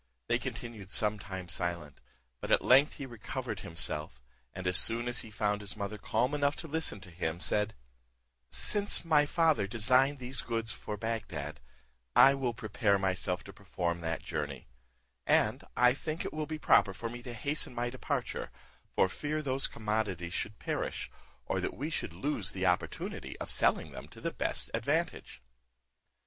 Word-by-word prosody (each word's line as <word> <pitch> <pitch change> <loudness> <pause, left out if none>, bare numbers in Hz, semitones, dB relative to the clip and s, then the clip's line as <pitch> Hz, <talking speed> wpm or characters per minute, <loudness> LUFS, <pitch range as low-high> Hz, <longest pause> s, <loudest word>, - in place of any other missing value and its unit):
They 120 +1 +3
continued 115 -5 -6
some 105 +1 +1
time 95 -2 -6
silent; 85 -5 -3 0.4
but - - -5
at - - +4
length 135 +4 +6
he 140 - -5
recovered 120 -4 -5
himself, 75 -5 -2 0.3
and 95 0 -7
as 90 0 +1
soon 115 +5 +4
as 120 -1 -1
he 110 - -7
found 105 -1 0
his 100 +1 -8
mother 105 +1 -4
calm 125 +7 +1
enough 145 -1 +2
to 165 - -7
listen 160 -7 -1
to 90 - -11
him, 85 -1 -2
said, 105 +2 +1 0.7
"Since 205 -4 +4
my 150 -3 +5
father 155 - +3
designed 130 +6 +3
these 130 +1 -3
goods 115 -2 -1
for 105 - -5
Bagdad, 115 +1 -3 0.6
I 135 - +9
will 130 -4 -1
prepare 110 -2 +1
myself 95 -1 -1
to 100 - -11
perform 90 -3 -2
that 80 0 -2
journey; 75 -3 -4 0.6
and - - +3
I 125 +1 +6
think 155 +3 -4
it - - -4
will 155 -1 -2
be 155 - -3
proper 95 -9 +4
for 115 +3 -4
me 120 +1 -7
to 120 -1 -7
hasten 140 +1 0
my 120 0 -1
departure, 130 - -2 0.5
for - - +5
fear 150 +9 -3
those 135 -1 +1
commodities 105 -6 -2
should 105 - -3
perish, - - -3 0.3
or - - -1
that - - -3
we 150 +5 -3
should - - -2
lose 135 -9 -2
the 95 0 -1
opportunity 90 -1 -1
of - - -2
selling - - +2
them - - -8
to - - -14
the - - -2
best - - -1
advantage." 65 0 -1
110 Hz, 170 wpm, -32 LUFS, 95-135 Hz, 0.7 s, I